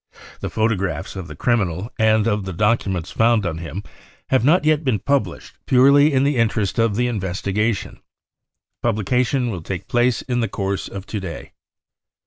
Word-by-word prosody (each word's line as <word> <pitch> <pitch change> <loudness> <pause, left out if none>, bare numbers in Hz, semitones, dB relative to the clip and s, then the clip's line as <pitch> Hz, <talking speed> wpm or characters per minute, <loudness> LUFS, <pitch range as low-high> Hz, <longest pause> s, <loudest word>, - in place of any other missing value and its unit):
The - - -4
photographs 100 -8 -1
of 95 -3 -6
the 75 - -9
criminal 100 - 0
and 110 -1 +3
of 105 -2 0
the 95 - -5
documents 95 -3 0
found 115 -2 +2
on 80 -2 -3
him 85 +4 -6 0.5
have 130 -3 +2
not 150 +4 +4
yet 155 0 +3
been 130 -6 +1
published 110 -5 -2
purely 140 +3 +5
in 135 -1 +2
the 140 -1 +1
interests 110 -3 0
of 115 -3 +2
the 120 +3 +1
investigation. 100 0 -2 0.8
Publication 125 +4 0
will 90 -4 -5
take 90 +1 -6
place 120 0 +1
in 125 -1 -1
the 115 -3 0
course 100 0 -3
of 100 0 -8
to 105 - -4
day. 90 -4 -7
110 Hz, 165 wpm, -21 LUFS, 95-125 Hz, 0.8 s, purely